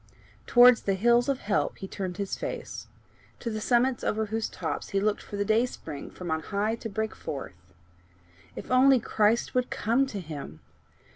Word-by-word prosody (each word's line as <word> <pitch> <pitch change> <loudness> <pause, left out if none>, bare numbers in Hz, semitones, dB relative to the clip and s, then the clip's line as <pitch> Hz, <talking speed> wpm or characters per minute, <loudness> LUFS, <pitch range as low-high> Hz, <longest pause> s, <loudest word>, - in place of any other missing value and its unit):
Towards 245 -1 +7
the 195 - 0
hills 240 +5 +3
of 270 -2 0
help 205 -1 0
he 195 - -7
turned 185 -2 -5
his 200 -1 -2
face - - -6 0.5
to 235 - -4
the 215 0 -4
summits 245 +2 +2
over 220 +1 0
whose 220 +1 -2
tops - - -4
he 195 - 0
looked 210 +1 0
for 205 - -7
the 205 - 0
dayspring 215 - -1
from 175 -3 -7
on 160 - +1
high 205 +6 -1
to 225 - -6
break 220 +1 -2
forth. 90 - -8 0.8
If - - -8
only 260 +1 +6
Christ 220 +1 +1
would 250 0 +1
come 240 +5 +1
to 210 -6 -5
him! 145 - -8
215 Hz, 175 wpm, -27 LUFS, 195-240 Hz, 0.8 s, Towards